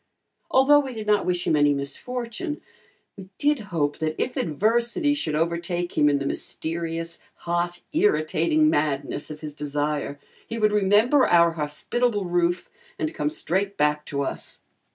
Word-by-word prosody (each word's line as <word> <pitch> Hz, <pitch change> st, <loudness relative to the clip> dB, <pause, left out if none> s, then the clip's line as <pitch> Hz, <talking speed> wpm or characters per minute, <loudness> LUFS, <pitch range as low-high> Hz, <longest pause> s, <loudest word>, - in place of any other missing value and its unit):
Although 290 Hz, 0 st, +6 dB
we 265 Hz, -4 st, -4 dB
did 215 Hz, -1 st, -5 dB
not 210 Hz, -1 st, +2 dB
wish 180 Hz, 0 st, 0 dB
him -, -, +2 dB
any 145 Hz, -1 st, +4 dB
misfortune, 245 Hz, -, -4 dB, 0.6 s
we 190 Hz, -2 st, -11 dB
did 295 Hz, 0 st, +2 dB
hope 150 Hz, -4 st, -1 dB
that 155 Hz, 0 st, -1 dB
if 255 Hz, -, -1 dB
adversity 235 Hz, -, +1 dB
should 160 Hz, -, -2 dB
overtake 170 Hz, +2 st, -1 dB
him 150 Hz, -1 st, +4 dB
in 145 Hz, -, +2 dB
the 140 Hz, -, -3 dB
mysterious, 165 Hz, +3 st, -3 dB, 0.3 s
hot, 175 Hz, +1 st, -1 dB
irritating 320 Hz, -3 st, +2 dB
madness 145 Hz, -, -1 dB
of 150 Hz, 0 st, -8 dB
his 150 Hz, -2 st, -6 dB
desire, 145 Hz, 0 st, -2 dB, 0.3 s
he 230 Hz, -, -5 dB
would 215 Hz, -1 st, +3 dB
remember 210 Hz, +7 st, +4 dB
our 170 Hz, -1 st, +5 dB
hospitable 195 Hz, +8 st, -1 dB
roof, 175 Hz, 0 st, 0 dB, 0.3 s
and 155 Hz, +1 st, -2 dB
come 150 Hz, -, -1 dB
straight 195 Hz, +6 st, -1 dB
back 150 Hz, 0 st, +2 dB
to 140 Hz, -1 st, -2 dB
us. -, -, -5 dB
175 Hz, 155 wpm, -24 LUFS, 150-230 Hz, 0.6 s, Although